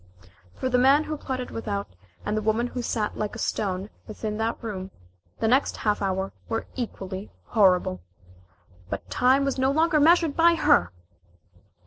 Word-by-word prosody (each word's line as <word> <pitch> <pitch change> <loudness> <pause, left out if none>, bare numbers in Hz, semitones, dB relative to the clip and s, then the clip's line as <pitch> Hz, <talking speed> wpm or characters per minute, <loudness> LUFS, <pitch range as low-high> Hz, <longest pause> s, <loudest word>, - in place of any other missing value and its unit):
For - - -2
the 250 -1 +2
man 275 +4 +5
who 310 - -4
plotted 260 -3 -5
without, 205 -3 -3 0.4
and 210 - -1
the 215 - 0
woman 220 +3 +1
who 245 0 -4
sat 220 -3 -2
like 210 -1 -2
a - - -6
stone 195 0 -2 0.2
within 215 0 -4
that 225 +1 -1
room, 190 -4 -5 0.5
the 225 - +1
next 260 +5 +2
half 210 -1 0
hour 190 0 -1 0.2
were 225 -1 -2
equally 195 -5 -5
horrible. 180 - +2 0.9
But - - -6
time 260 +2 +3
was 275 -1 -1
no 260 +1 +3
longer 315 +2 +3
measured 330 0 +4
by 335 +1 +5
her! 90 - +3
225 Hz, 160 wpm, -25 LUFS, 205-270 Hz, 0.9 s, man